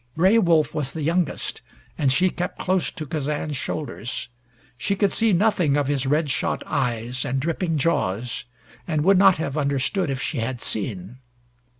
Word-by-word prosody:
Gray 190 +7 +5
Wolf 160 -6 +3
was 145 -4 -2
the 160 - -4
youngest, 170 0 -1 0.3
and 140 -4 +2
she 180 +7 +3
kept 180 - -4
close 185 -1 0
to 160 -4 -6
Kazan's 150 0 -2
shoulders. 130 -4 -4 0.5
She 160 - -1
could 200 -1 +2
see 225 -1 +3
nothing 180 -6 +3
of 145 - +1
his 140 -1 0
red 150 +1 +1
shot 125 - -1
eyes 120 +1 -1
and 135 +1 -1
dripping 165 +2 -1
jaws, 120 - -1 0.4
and 155 -3 0
would 190 +2 +5
not 195 -1 +7
have 155 -1 -2
understood 140 +5 0
if 135 -1 -2
she - - -2
had 120 +2 -2
seen. 105 +2 -4
150 Hz, 170 wpm, -23 LUFS, 130-175 Hz, 0.5 s, not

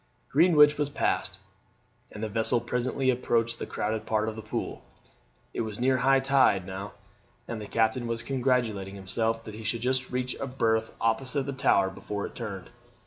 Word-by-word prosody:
Greenwich 150 -1 +5
was 145 -1 +1
passed, 145 - -1 0.7
and 105 - -7
the - - 0
vessel 110 +2 +2
presently 130 +2 0
approached 115 -2 0
the - - -4
crowded 110 +1 -2
part 110 -1 +1
of 110 - -3
the 110 - -6
Pool. - - -4 0.7
It - - -2
was 110 -1 -4
near 130 +1 +3
high 135 +2 +4
tide 135 -9 +3
now, 95 +1 -6 0.5
and 115 -2 -4
the 105 - -7
captain 115 +2 +1
was 115 -1 -2
congratulating 120 -7 0
himself 115 +4 -1
that 110 - -8
he 110 +1 -8
should 110 +2 -2
just 130 +1 0
reach 125 0 -2
a 135 - -3
berth 110 -4 0
opposite 130 +5 0
the 140 - -3
Tower 100 -7 +3
before 100 +1 -5
it - - -8
turned. 100 -6 -6
115 Hz, 180 wpm, -28 LUFS, 110-130 Hz, 0.7 s, Greenwich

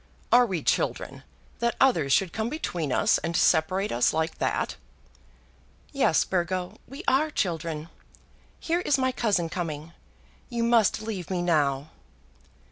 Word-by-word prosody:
Are 245 +1 +6
we 185 -6 -3
children, - - -1 0.4
that 235 0 0
others 170 - +3
should 180 +5 +2
come 220 +1 -2
between 175 - -3
us - - +3
and 170 +1 -2
separate 185 +5 +2
us 120 +1 +2
like 160 +1 -2
that?" - - -1 1.2
"Yes, 275 - +2
Burgo; 180 0 -2
we 275 +7 -9
are 300 +4 +3
children. 165 - -2 0.7
Here 340 +1 0
is 295 -5 +1
my 260 -1 +1
cousin 205 -9 0
coming. 165 -2 -5 0.6
You 235 -2 -2
must 230 -2 +3
leave 205 -6 -5
me 180 -2 -1
now." 145 -4 +1
185 Hz, 135 wpm, -26 LUFS, 160-235 Hz, 1.2 s, Are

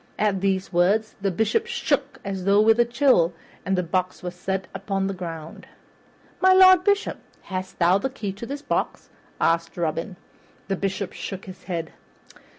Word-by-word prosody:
At 205 -3 +1
these 195 -1 0
words 200 +6 +2
the 195 - +1
Bishop 225 - 0
shook 285 - -1
as 195 -2 -3
with 210 +4 +4
a 240 - +6
chill, 235 - +3 0.3
and 190 0 0
the 180 - +1
box 185 +2 -2
was 180 -1 -4
set 190 +1 -3
upon 195 0 -2
the 195 - -1
ground. 165 -4 -8 0.7
"My 375 0 +6
Lord 370 -1 +7
Bishop, 405 +1 +1 0.2
hast 185 0 -5
thou 180 +2 +4
the 265 - -2
key 220 -6 -5
of 235 - -5
this 285 +1 -5
box?" 285 - -2 0.3
asked 165 +1 +1
Robin. 165 +3 -2 0.5
The 195 - +1
Bishop 195 0 -3
shook 195 0 -6
his 185 -1 -11
head. 170 -3 -4
195 Hz, 165 wpm, -24 LUFS, 180-235 Hz, 0.7 s, Lord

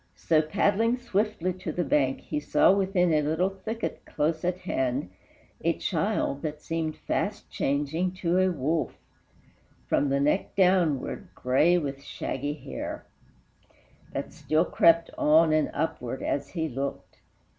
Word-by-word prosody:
So, 160 -2 +2
paddling 205 +9 +1
swiftly 210 -6 -1
to 185 +1 -5
the 175 - -1
bank, 135 -3 +1
he 150 - -3
saw, 150 - +4
Within 190 -3 +2
a 155 - +3
little 160 +6 +1
thicket 220 +4 -5
close 160 +2 -1
at 180 0 0
hand, 130 - -1 0.5
A - - +3
child 140 +1 -1
that 150 -1 -4
seemed 160 0 -3
fast - - -3
changing 150 +6 -1
to 180 -1 0
a 185 0 +4
wolf, 155 +1 -1 0.9
From 145 - +2
the 140 0 +1
neck 150 +7 0
downward, 180 -7 +2
gray 150 +8 +3
with 140 -4 -3
shaggy 145 +1 -4
hair 155 - -6 1.1
That - - -5
still 155 +3 +1
crept 165 0 +4
on 155 +1 +5
and 155 -1 +2
upward 135 -5 -3
as 140 0 -1
he 160 -3 -2
looked. 135 0 -5
160 Hz, 140 wpm, -27 LUFS, 145-180 Hz, 1.1 s, on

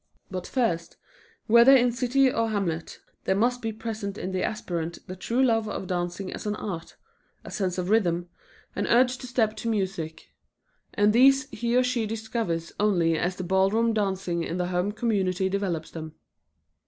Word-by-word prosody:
But 185 -2 -4
first, 170 -10 -1 0.5
whether 235 +4 +7
in 245 -1 +4
city 255 +2 +2
or 230 -1 0
hamlet, 175 -6 -2 0.3
there 190 - +2
must 245 +4 +1
be 225 -1 -2
present 220 -2 -5
in 190 - -4
the 185 -1 -1
aspirant 170 -6 -3
the 185 - -7
true 235 +7 0
love 225 -4 +2
of 195 - -4
dancing 180 +1 -3
as - - -6
an 210 - -1
art, 175 -6 -6 0.5
a - - -9
sense 185 -3 -2
of 180 +2 -2
rhythm, 175 -5 +2 0.5
an - - -1
urge 250 +1 +3
to 255 - -8
step 225 -4 +1
to 230 - -3
music, 190 -7 -3 0.6
and 205 0 +4
these 270 +2 +5
he 235 0 -1
or 255 - +5
she 250 -3 0
discovers 220 -6 -3
only 175 -6 +3
as 175 +3 -1
the 185 - -5
ballroom 195 +5 +2
dancing 190 -4 -1
in 170 - -3
the 180 0 -1
home 180 +3 0
community 195 -5 0
develops 185 -5 -2
them. 160 -1 -8
205 Hz, 175 wpm, -26 LUFS, 180-230 Hz, 0.6 s, whether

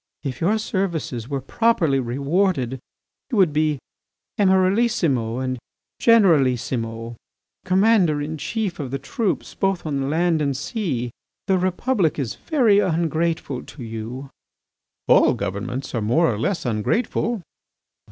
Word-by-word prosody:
If 135 0 -5
your 200 +7 +2
services 170 - -2
were 140 -2 -2
properly 165 - +2
rewarded, 135 +1 0 0.5
you 245 - -1
would 180 -7 +4
be 155 -1 +1 0.6
Emiralissimo 185 - +2
and 130 -1 -2 0.4
Generalissimo, 125 - +2 0.5
Commander 185 -4 +3
in 150 +2 -3
chief 210 0 -3
of 140 -4 -4
the 135 - -2
troops 190 - -2
both 195 -3 -1
on 140 -3 -1
land 165 +1 +1
and 140 -3 0
sea. 145 - -3 0.3
The 190 -1 +2
Republic 185 - 0
is 135 -6 -2
very 240 -10 +3
ungrateful 165 -5 0
to 135 - -10
you." 115 +4 -6 0.8
"All - - +5
governments 120 +8 -4
are 115 - -1
more 120 +6 +2
or 105 - -5
less 190 - -1
ungrateful." 200 - -1
155 Hz, 125 wpm, -22 LUFS, 130-190 Hz, 0.8 s, All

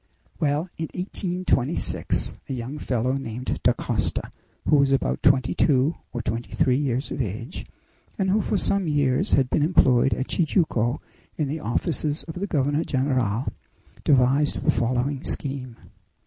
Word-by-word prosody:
Well, 150 +3 +1
in 160 - -3
1826, 180 -6 0 0.2
a - - -2
young 130 +4 -5
fellow 125 -1 0
named 125 -1 -4
Dacosta, - - 0 0.4
who 150 - +5
was 140 -1 +3
about 135 - +1
twenty 135 -4 +3
two 140 +2 +3 0.2
or 120 -2 -4
twenty 115 +2 -3
three 130 0 +3
years 135 -1 -1
of - - -2
age, 115 - -5 0.5
and 190 -2 +1
who 215 +2 +3
for 205 - 0
some 195 -1 +1
years 145 -4 +1
had 135 -2 +4
been - - +2
employed 135 -5 +4
at 130 - -3
Tijuco 150 - +1 0.4
in 150 - 0
the 150 +4 -3
offices 150 +5 -1
of 160 - -8
the 200 - -2
governor 145 -1 +1
general, 130 -4 0 0.5
devised 135 +2 +3
the - - +4
following 125 +3 -1
scheme. 130 -4 -1
135 Hz, 150 wpm, -24 LUFS, 125-155 Hz, 0.5 s, who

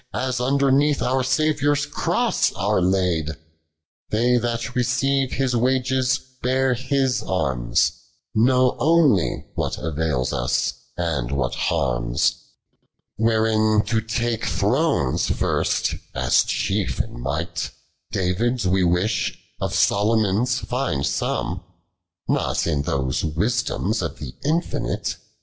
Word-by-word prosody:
As 130 -1 -1
underneath 140 +2 +3
our 130 +1 +1
Saviour 145 +2 +2
s 145 0 0
cross - - 0
are - - +1
laid: 90 -4 +1 0.7
They 120 +3 +2
that 120 +1 -2
receive 135 +2 +1
His 130 -2 0
wages, 130 +1 +1 0.2
bear 130 +1 +2
His 130 +1 0
arms, 65 -10 +1 0.4
Know 125 +3 +3
onely 150 - +3
what - - -2
avails 75 -5 -1
us, 60 0 0 0.2
and 80 -9 -1
what 65 -3 -1
harms. - - 0 0.9
91. 110 - +3
Wherein 110 -1 +2
to 110 +1 0
take 115 0 -2
thrones 115 - +1
first, - - 0 0.2
as - - +3
chief - - -1
in - - -4
nii*>ht 75 +6 -3 0.4
David's 100 +5 0
we 95 +1 +2
wish, 90 +5 +1 0.2
of - - -2
Salomon's 110 +3 +2
find 75 - -1
some, 70 0 -2 0.6
!Not - - 0
in 75 -4 0
those 65 -2 -1
wisdoms 105 +10 0
of - - -4
the 70 -3 -7
infinite. 160 +4 -1
115 Hz, 115 wpm, -22 LUFS, 85-130 Hz, 0.9 s, underneath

